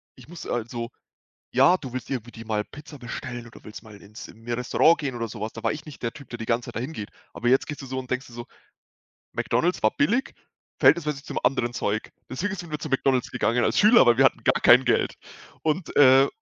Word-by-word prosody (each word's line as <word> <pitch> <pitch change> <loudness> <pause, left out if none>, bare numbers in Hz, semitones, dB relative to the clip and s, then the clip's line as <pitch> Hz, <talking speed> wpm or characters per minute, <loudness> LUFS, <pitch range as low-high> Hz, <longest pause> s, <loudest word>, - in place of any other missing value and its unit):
ich - - -16
muss 175 +1 -9
also 120 0 -3 0.6
ja, 135 +7 +5
du 130 -7 -8
willst 130 0 -6
irgendwie 120 -3 -4
dir 115 -1 -11
mal 105 -1 -1
Pizza 150 -1 -12
bestellen 120 0 -7
oder 115 - -15
willst 105 - -10
mal 105 -3 -14
ins 105 +2 -11
in 115 +1 -16
'n 120 - -2
Restaurant 125 +7 +3
gehen 135 -5 -3
oder 115 -1 -3
so 110 -1 -9
was. 110 - -4
Da 115 - -9
war - - +2
ich 150 0 -7
nicht 150 -4 -12
der 115 - -1
Typ, 140 - -13
der 120 - -6
die 115 - -6
ganze 115 +1 -1
Zeit - - -9
dahin 125 +7 -3
geht. 105 -5 -6 0.2
Aber 120 - -3
jetzt 130 +2 +4
gehst 145 -1 -7
du - - -8
so 130 - -5
und 130 -1 -6
denkst 130 +1 -2
dir 120 - -15
so, 120 0 -7 0.9
„McDonald's 180 +2 0
war 110 - +3
billig, 230 - +1 0.5
verhältnismäßig 150 -4 +3
zum - - -4
anderen 125 -2 +1
Zeug.“ 110 -3 -2 0.2
Deswegen 200 +10 -3
sind 170 -3 -8
wir 150 - -3
zu 155 -1 -6
McDonald's 135 -1 +1
gegangen 120 +1 +1
als - - +1
Schüler, 215 - +7
weil 120 +1 +4
wir 135 - +7
hatten - - -1
gar - - +2
kein 125 +2 +7
Geld 120 - +1 0.5
und, 160 +3 -2
äh 135 0 +7
125 Hz, 240 wpm, -25 LUFS, 115-145 Hz, 0.9 s, Schüler